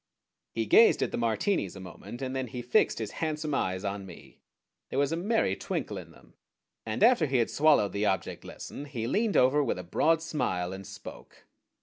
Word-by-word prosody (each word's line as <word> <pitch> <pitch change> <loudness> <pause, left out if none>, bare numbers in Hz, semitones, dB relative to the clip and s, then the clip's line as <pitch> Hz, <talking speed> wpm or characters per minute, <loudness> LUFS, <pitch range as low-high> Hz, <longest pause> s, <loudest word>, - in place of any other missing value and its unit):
He 115 - -2
gazed 225 - +6
at - - -2
the - - -2
Martinis 115 - 0
a - - -8
moment, 95 +7 -9
and 130 0 -3
then 130 -1 -2
he 120 +1 -6
fixed 125 - +2
his 110 -3 -4
handsome 155 -1 -2
eyes 95 -7 -1
on 100 0 -3
me. 85 - -14 0.5
There - - -4
was 140 +1 +2
a - - +1
merry 210 +7 +1
twinkle - - -4
in - - -11
them, - - -19 0.5
and - - -1
after 230 -10 +5
he 135 -1 +1
had 115 - +1
swallowed 145 - +4
the 105 +1 0
object 95 - -2
lesson 145 - -8
he 120 -5 -4
leaned 210 - +1
over 135 +4 +4
with 125 - -1
a 90 - -6
broad 160 - +2
smile 110 - -2
and 95 -1 -8
spoke. - - -11
125 Hz, 205 wpm, -29 LUFS, 100-155 Hz, 0.5 s, gazed